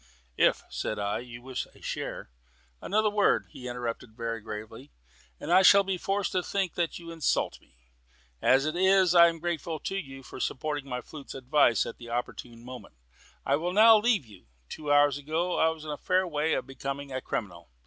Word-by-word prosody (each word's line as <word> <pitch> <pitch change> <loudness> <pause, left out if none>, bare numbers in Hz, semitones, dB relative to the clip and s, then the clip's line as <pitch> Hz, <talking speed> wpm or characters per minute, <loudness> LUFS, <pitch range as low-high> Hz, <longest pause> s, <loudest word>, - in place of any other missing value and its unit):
"If," - - +3
said 110 - -4
I, 100 0 -1
"you 120 0 -10
wish 130 -1 -4
a - - -17
share - - -5 0.2
" - - -36
"Another 215 +1 +1
word," 205 -1 +2
he 125 - -9
interrupted 120 -2 -5
very 115 -1 -3
gravely, 110 +5 -8 0.5
"and 170 - -1
I 185 - +7
shall 200 +1 +7
be 190 -2 -2
forced 195 +1 -1
to 185 - +1
think 190 -1 -2
that 170 -2 -2
you 170 -1 -9
insult 165 -3 -1
me. - - -28 0.7
As 135 +2 +4
it 155 +2 -2
is, 190 -1 +4
I 170 -1 +8
am 165 0 -2
grateful 165 -1 -3
to 195 - -3
you 135 -8 -6
for - - -10
supporting 145 +2 -3
my 125 -1 -3
flute's 145 +2 -10
advice 130 -2 +3
at - - -8
an 120 - -10
opportune 120 0 -5
moment. 125 - -10 0.5
I 140 - +2
will 175 +3 -2
now 220 +3 +8
leave 215 - +2
you. 100 - -17 0.2
Two 150 -2 -4
hours 145 -1 +4
ago 160 +5 -1
I 160 - +4
was 160 -1 -6
in 155 - -4
a 145 - -4
fair 185 0 +1
way 155 -1 0
of - - -3
becoming 140 +1 -6
a 130 0 -3
criminal. 85 -9 -5
145 Hz, 200 wpm, -28 LUFS, 125-175 Hz, 0.7 s, I